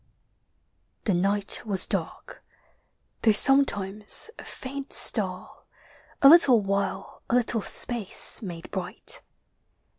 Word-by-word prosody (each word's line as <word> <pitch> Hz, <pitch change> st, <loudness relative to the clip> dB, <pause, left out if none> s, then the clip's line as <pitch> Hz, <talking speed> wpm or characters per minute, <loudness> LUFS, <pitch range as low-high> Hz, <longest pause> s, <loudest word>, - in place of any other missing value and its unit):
The 205 Hz, -, -2 dB
night 200 Hz, +3 st, -1 dB
was 200 Hz, -5 st, +3 dB
dark, 190 Hz, -6 st, -6 dB, 0.8 s
though 220 Hz, -, +2 dB
sometimes 210 Hz, -, +2 dB
a -, -, -11 dB
faint 275 Hz, +1 st, -10 dB
star 185 Hz, -4 st, +1 dB, 0.6 s
A -, -, +7 dB
little 280 Hz, -6 st, +6 dB
while 195 Hz, -1 st, -5 dB
a -, -, -1 dB
little 235 Hz, -2 st, -1 dB
space 230 Hz, -1 st, +1 dB
made 175 Hz, -5 st, -10 dB
bright. 180 Hz, -2 st, -5 dB
205 Hz, 100 wpm, -23 LUFS, 190-245 Hz, 0.8 s, A